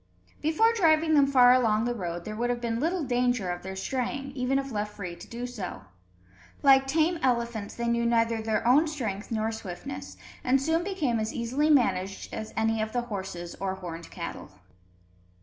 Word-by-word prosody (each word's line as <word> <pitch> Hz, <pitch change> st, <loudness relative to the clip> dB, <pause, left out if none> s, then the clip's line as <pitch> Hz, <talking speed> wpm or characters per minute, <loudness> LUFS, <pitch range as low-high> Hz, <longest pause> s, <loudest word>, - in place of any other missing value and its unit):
Before 440 Hz, +10 st, +3 dB
driving 320 Hz, -6 st, +3 dB
them 285 Hz, -2 st, +5 dB
far 250 Hz, -2 st, +7 dB
along 225 Hz, -3 st, +3 dB
the 240 Hz, -, 0 dB
road, 175 Hz, -5 st, -5 dB
there 215 Hz, -, -5 dB
would 240 Hz, +2 st, -1 dB
have 245 Hz, 0 st, 0 dB
been 230 Hz, -1 st, -2 dB
little 335 Hz, +4 st, 0 dB
danger 245 Hz, -6 st, +1 dB
of 175 Hz, -, -5 dB
their 190 Hz, 0 st, -6 dB
straying, 265 Hz, +6 st, -3 dB
even 265 Hz, 0 st, 0 dB
if 275 Hz, 0 st, -3 dB
left 210 Hz, -1 st, -3 dB
free 180 Hz, -4 st, -6 dB
to -, -, -12 dB
do 240 Hz, +1 st, -5 dB
so. 200 Hz, -, -6 dB, 0.8 s
Like 270 Hz, -1 st, +6 dB
tame 320 Hz, +4 st, +2 dB
elephants, 235 Hz, -4 st, -1 dB
they 235 Hz, 0 st, -2 dB
knew 235 Hz, 0 st, +1 dB
neither 230 Hz, -1 st, +2 dB
their 220 Hz, +1 st, 0 dB
own 290 Hz, +6 st, +5 dB
strength 225 Hz, -10 st, -4 dB
nor 220 Hz, -1 st, -1 dB
swiftness, 95 Hz, -, -7 dB, 0.3 s
and 260 Hz, +2 st, +3 dB
soon 320 Hz, +5 st, +1 dB
became 315 Hz, -, -1 dB
as 215 Hz, 0 st, -3 dB
easily 260 Hz, +6 st, 0 dB
managed 195 Hz, -9 st, +1 dB
as 220 Hz, -, -5 dB
any 220 Hz, 0 st, +1 dB
of 215 Hz, 0 st, -3 dB
the 245 Hz, -, +1 dB
horses 190 Hz, -6 st, -6 dB
or 190 Hz, -1 st, -2 dB
horned 170 Hz, -3 st, -8 dB
cattle. -, -, -7 dB
235 Hz, 185 wpm, -28 LUFS, 210-270 Hz, 0.8 s, far